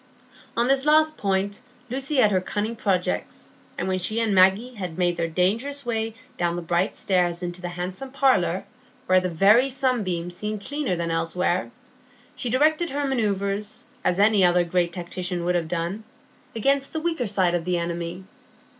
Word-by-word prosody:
On 235 +1 +3
this 270 0 +3
last 310 +1 +4
point 200 -1 -1 0.3
Lucy 270 +3 -2
had 220 -6 +5
her 185 -2 +2
cunning 210 +4 -3
projects, 190 -5 -2 0.3
and - - -2
when 185 0 0
she 215 +5 0
and 225 -3 +1
Maggie 195 +7 +4
had 185 -7 -6
made 175 -1 +1
their 170 -1 -1
dangerous 225 - 0
way 225 -1 -2 0.2
down 175 -1 0
the 175 - -4
bright 175 +4 0
stairs 180 -2 0
into 175 0 -5
the 175 - -4
handsome 180 +8 -5
parlour, 255 -10 +2 0.4
where 185 0 +5
the 185 0 -2
very 205 +10 +5
sunbeams 205 -10 -1
seemed 210 +1 -4
cleaner 285 -8 -1
than 170 -1 -2
elsewhere, 165 -4 0 0.7
she 245 - -3
directed 310 +7 +2
her 285 +1 -2
manœuvres, 205 -4 -1 0.2
as 180 - +1
any 205 -1 +4
other 175 0 +4
great 175 0 0
tactician 180 0 -4
would 180 - +1
have 170 -2 0
done, 175 +5 -3 0.5
against 275 +6 +1
the 315 - -1
weaker 325 -7 -1
side 185 -3 +1
of 175 -1 0
the 180 0 0
enemy. 170 +1 -4
190 Hz, 170 wpm, -24 LUFS, 175-240 Hz, 0.7 s, had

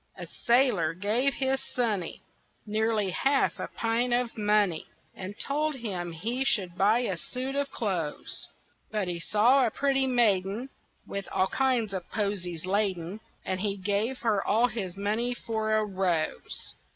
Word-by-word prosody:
A - - -6
sailor 235 - +2
gave 230 +8 +1
his 265 0 0
sonny 215 -8 -1 0.4
Nearly 215 -2 +1
half 275 +8 +2
a - - -3
pint 235 +2 0
of 245 -1 -1
money 210 -6 +2 0.3
And 190 +2 -7
told 300 +2 0
him 190 -8 -4
he 230 +11 -1
should 185 -9 +1
buy 210 +6 +4
a 210 -7 -1
suit 255 +9 -4
of 280 0 0
clothes; 180 - -3 0.4
But 210 -3 -1
he 175 -1 -2
saw 230 +9 +4
a 240 - +3
pretty 270 +2 +2
maiden 225 -1 +2 0.4
With 200 -1 -5
all 190 0 +2
kinds 250 -6 +1
of 185 -3 -5
posies 185 -6 -2
laden, 190 -1 -1 0.3
And 185 - -1
he 205 -1 0
gave 205 +6 0
her 215 -4 +2
all 225 +4 +3
his 190 -6 -4
money 220 +5 0
for 220 -2 -1
a 215 0 +2
rose. 185 -5 -1
215 Hz, 150 wpm, -28 LUFS, 190-245 Hz, 0.4 s, buy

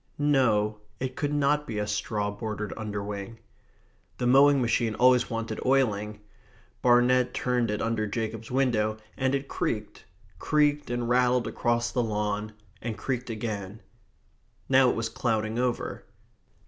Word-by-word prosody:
No, 110 -8 +2 0.2
it 130 0 -3
could 145 -1 -1
not 150 0 +1
be 110 - -4
a 105 - 0
straw 105 0 -2
bordered 105 -1 -5
underwing. 105 0 -5 0.8
The 125 - -2
mowing 140 +3 +6
machine 115 -2 +1
always 125 0 +4
wanted 115 -1 -4
oiling. 105 -6 +1 0.6
Barnet 125 +1 +4
turned 125 -2 0
it 105 0 -1
under 115 -2 0
Jacob's 110 +1 -4
window, 115 -5 +1 0.2
and 130 +1 +1
it 140 0 -3
creaked 105 -2 -3 0.3
creaked, 150 -2 +1
and 120 -1 -2
rattled 125 0 +3
across 120 0 0
the 125 - +1
lawn 105 -1 -2 0.3
and 110 -2 -4
creaked 125 +2 -3
again. 105 -2 -4 0.9
Now 130 -1 +5
it - - 0
was 115 0 -1
clouding 110 -1 -1
over. 125 -1 -2
115 Hz, 135 wpm, -27 LUFS, 105-125 Hz, 0.9 s, mowing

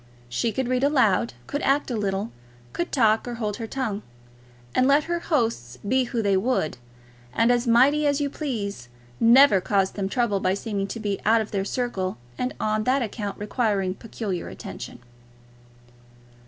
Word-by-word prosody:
She 225 - 0
could 255 +4 -2
read 255 +1 0
aloud, 240 -7 +2
could 285 - -3
act 275 0 +1
a - - -1
little, 200 0 -2 0.4
could 345 - -3
talk 225 -4 +3
or 240 - -4
hold 210 -3 -3
her 225 - -5
tongue; 220 -5 -3 0.7
and 255 - +3
let 285 +2 +4
her 345 +2 -2
hosts 225 - -1
be 260 +3 +2
who 235 -2 -2
they 200 -1 +3
would 190 - 0 0.5
and 230 - +3
as 245 0 +1
mighty 275 +6 +4
as 285 0 +2
you 290 - 0
please, 210 - -4 0.3
never 235 -3 +6
caused 195 0 +1
them 195 -2 -2
trouble 235 -4 +1
by 185 0 +1
seeming 200 -2 -3
to 230 - -6
be 205 -2 -2
out 225 +2 +4
of 220 - -4
their 195 -2 -1
circle, 200 -4 -2 0.2
and 250 +1 -3
on 215 0 0
that 260 +1 +2
account 205 -2 -4
requiring 205 -3 0
peculiar 200 -3 -5
attention. - - -8
225 Hz, 170 wpm, -25 LUFS, 200-255 Hz, 0.7 s, never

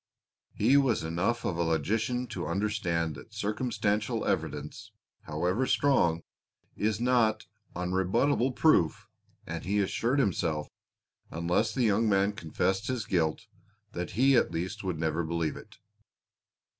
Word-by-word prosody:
He 125 +7 +4
was 135 -9 +2
enough 90 +9 -1
of 85 - -1
a - - 0
logician 110 - 0
to 90 -8 -4
understand 85 -3 -1
that - - -13
circumstantial 105 -1 -1
evidence, 75 +9 -3 0.3
however 90 +11 0
strong, 85 -13 +2 0.5
is 105 0 0
not 120 -3 +2 0.3
unrebuttable 95 +9 +1
proof, 90 - +3 0.4
and - - -5
he 100 +3 -1
assured 115 +6 0
himself, 85 - 0 0.6
unless 85 +7 0
the 125 +3 0
young 110 0 +3
man 100 +1 +2
confessed 95 +2 -1
his 125 -4 -2
guilt, 80 -5 0 0.5
that 90 0 -5
he 135 +2 +5
at 120 - +3
least 90 +4 -4
would 90 -4 -2
never 80 +1 -1
believe 80 -1 -2
it. - - -13
100 Hz, 130 wpm, -29 LUFS, 85-115 Hz, 0.6 s, he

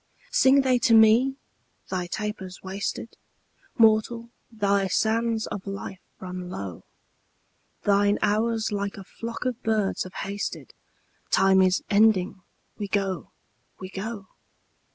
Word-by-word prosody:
Sing 280 - +5
they 255 -2 +2
to 235 -1 +4
me? 225 +5 +6 0.6
'Thy 180 -2 -2
taper's 190 -1 -5
wasted; 195 +4 -4 0.6
Mortal, 230 +1 +3 0.2
thy 200 -3 +1
sands 225 +4 +1
of 200 0 -6
life 195 -1 -6 0.2
run 180 -1 -6
low; 95 - -6 1.0
Thine 205 0 +3
hours 220 +2 +1
like 200 0 -3
a 195 - -8
flock 230 +5 -7
of 250 -2 -2
birds 215 -3 0
have 185 - -5
hasted: 200 +1 -5 0.6
Time 190 0 +5
is 185 0 +2
ending; 200 -3 +3 0.4
we 205 - -3
go, 195 -2 -2 0.5
we 185 0 -8
go.' 205 +1 -5
205 Hz, 120 wpm, -26 LUFS, 190-225 Hz, 1.0 s, me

